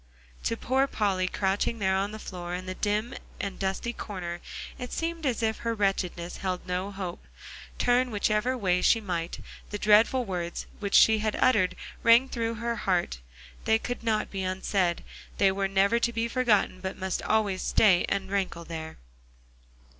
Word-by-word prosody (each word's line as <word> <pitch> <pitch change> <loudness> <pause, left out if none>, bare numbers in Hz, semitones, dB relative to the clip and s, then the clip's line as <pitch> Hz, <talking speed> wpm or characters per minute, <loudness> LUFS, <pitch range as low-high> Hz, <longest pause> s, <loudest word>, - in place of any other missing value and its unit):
To 230 - 0
poor 265 +4 +1
Polly, 195 -6 0
crouching 195 +4 0
there 190 -3 +1
on 195 +2 0
the 215 - -6
floor 180 -4 -6
in 185 +1 -6
the 185 - -4
dim 210 +5 -1 0.3
and 200 -2 -4
dusty 195 +5 -2
corner, 175 -6 -6 0.4
it 250 - -6
seemed 330 -2 -2
as 240 -2 -1
if 220 0 +1
her 230 -1 -2
wretchedness 185 -4 -1
held 185 -2 -3
no 180 +2 -2
hope. 185 -3 -6 0.5
Turn 245 +1 +3
whichever 215 +3 +1
way 180 -5 +1
she 230 - +4
might, 175 -5 -3 0.3
the 205 - -3
dreadful 220 +5 +4
words 175 -3 -4 0.3
she 220 +1 +6
had 215 0 -1
uttered 185 -7 +3 0.3
rang 235 +3 +6
through 230 -2 -2
her 235 +1 -2
heart. 175 - 0 0.5
They 220 - +4
could 245 +1 -5
not 220 -2 0
be 195 - -3
unsaid; 185 -1 0 0.3
they 195 -1 +4
were 195 0 0
never 195 +4 +3
to 235 - +1
be 230 0 -1
forgotten 230 -7 +2
but 190 0 -4
must 190 -1 -2
always 205 -4 +1
stay 190 -5 +4
and 195 -1 -2
rankle 185 -4 -2
there. 160 -1 -7
200 Hz, 170 wpm, -28 LUFS, 185-230 Hz, 0.5 s, she